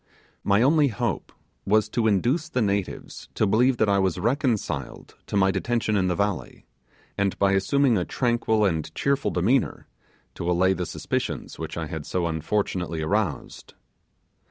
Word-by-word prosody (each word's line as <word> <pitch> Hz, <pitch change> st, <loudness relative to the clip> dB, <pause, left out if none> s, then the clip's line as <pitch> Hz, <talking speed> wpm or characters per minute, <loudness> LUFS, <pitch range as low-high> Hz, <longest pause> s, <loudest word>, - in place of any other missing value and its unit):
My 100 Hz, +4 st, +3 dB
only 150 Hz, +2 st, +4 dB
hope 120 Hz, -4 st, -3 dB, 0.3 s
was 110 Hz, +1 st, +2 dB
to 115 Hz, 0 st, 0 dB
induce 120 Hz, -, +1 dB
the 125 Hz, -, 0 dB
natives 100 Hz, -2 st, -3 dB
to -, -, +2 dB
believe 120 Hz, +5 st, +3 dB
that 110 Hz, -, +2 dB
I 100 Hz, -1 st, +3 dB
was 95 Hz, -4 st, +1 dB
reconciled 115 Hz, -, -2 dB
to -, -, -1 dB
my 95 Hz, -1 st, +4 dB
detention 110 Hz, +2 st, -1 dB
in 95 Hz, -2 st, +2 dB
the 90 Hz, -, 0 dB
valley, 100 Hz, 0 st, -3 dB, 0.5 s
and 100 Hz, -1 st, 0 dB
by 100 Hz, 0 st, +3 dB
assuming 115 Hz, +4 st, +2 dB
a -, -, 0 dB
tranquil 115 Hz, -1 st, +1 dB
and 80 Hz, -4 st, -1 dB
cheerful 140 Hz, 0 st, +1 dB
demeanour, 115 Hz, +9 st, 0 dB, 0.5 s
to 85 Hz, -, -4 dB
allay 95 Hz, +2 st, +3 dB
the 90 Hz, -2 st, -3 dB
suspicions 85 Hz, -, -4 dB
which 80 Hz, 0 st, -5 dB
I 85 Hz, -, -2 dB
had 75 Hz, -1 st, -6 dB
so 90 Hz, -2 st, -1 dB
unfortunately 85 Hz, 0 st, -2 dB
aroused. 95 Hz, -2 st, -2 dB
100 Hz, 155 wpm, -25 LUFS, 90-120 Hz, 0.5 s, only